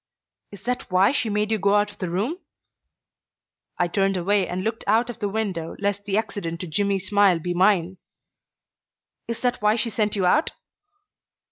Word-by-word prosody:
"Is 200 Hz, -, -12 dB
that 250 Hz, +1 st, -3 dB
why 185 Hz, +3 st, +4 dB
she 250 Hz, -5 st, 0 dB
made 210 Hz, +1 st, 0 dB
you 220 Hz, -, +1 dB
go 200 Hz, +2 st, +3 dB
out 205 Hz, 0 st, +2 dB
of 205 Hz, -, -17 dB
the 185 Hz, -, -3 dB
room?" 220 Hz, -, -2 dB, 1.4 s
I 175 Hz, -, +2 dB
turned 195 Hz, +1 st, +1 dB
away 195 Hz, +2 st, +1 dB
and 185 Hz, +1 st, -3 dB
looked 225 Hz, +2 st, -3 dB
out 225 Hz, +3 st, +2 dB
of 235 Hz, -, -13 dB
the 205 Hz, -2 st, -1 dB
window 195 Hz, -6 st, -3 dB
lest 200 Hz, 0 st, -2 dB
the 205 Hz, 0 st, 0 dB
accident 200 Hz, -6 st, -3 dB
to -, -, -4 dB
Jimmy's 195 Hz, +2 st, -1 dB
smile 200 Hz, -3 st, +4 dB
be 175 Hz, +2 st, -3 dB
mine. 185 Hz, -1 st, +2 dB, 1.3 s
"Is 230 Hz, -1 st, -4 dB
that 245 Hz, -3 st, 0 dB
why 210 Hz, +1 st, +3 dB
she 230 Hz, 0 st, 0 dB
sent 210 Hz, 0 st, 0 dB
you 195 Hz, -3 st, 0 dB
out?" 300 Hz, -, +2 dB
205 Hz, 180 wpm, -24 LUFS, 185-215 Hz, 1.4 s, why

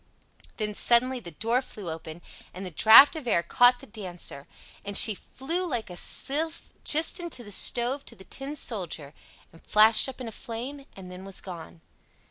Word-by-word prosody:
Then 210 Hz, -1 st, -3 dB
suddenly 245 Hz, +4 st, +2 dB
the 175 Hz, -, -10 dB
door 230 Hz, -, -1 dB
flew 210 Hz, -7 st, -10 dB
open, 160 Hz, +1 st, -9 dB, 0.3 s
and 190 Hz, +1 st, -7 dB
the 180 Hz, -, -7 dB
draft 225 Hz, -, +8 dB
of 305 Hz, -6 st, -7 dB
air 170 Hz, -7 st, +1 dB
caught 245 Hz, +8 st, +4 dB
the -, -, -11 dB
Dancer, 180 Hz, -9 st, -8 dB, 0.4 s
and 200 Hz, 0 st, +1 dB
she 215 Hz, -, +7 dB
flew 320 Hz, -, -4 dB
like 240 Hz, -, -4 dB
a -, -, -8 dB
sylph 315 Hz, -, -2 dB
just 315 Hz, +4 st, +3 dB
into 340 Hz, -8 st, -5 dB
the 205 Hz, -, -12 dB
stove 245 Hz, +7 st, 0 dB
to 230 Hz, -, -8 dB
the 190 Hz, -, -14 dB
Tin 275 Hz, +8 st, -7 dB
Soldier, 175 Hz, -, -4 dB, 0.4 s
and 165 Hz, -, -18 dB
flashed 220 Hz, +4 st, +4 dB
up 265 Hz, -, -10 dB
in 250 Hz, -, -7 dB
a -, -, -7 dB
flame, 255 Hz, +6 st, -8 dB
and 185 Hz, -2 st, -11 dB
then 180 Hz, +1 st, -10 dB
was 195 Hz, -1 st, -6 dB
gone! 170 Hz, -3 st, -10 dB
225 Hz, 185 wpm, -26 LUFS, 185-260 Hz, 0.4 s, draft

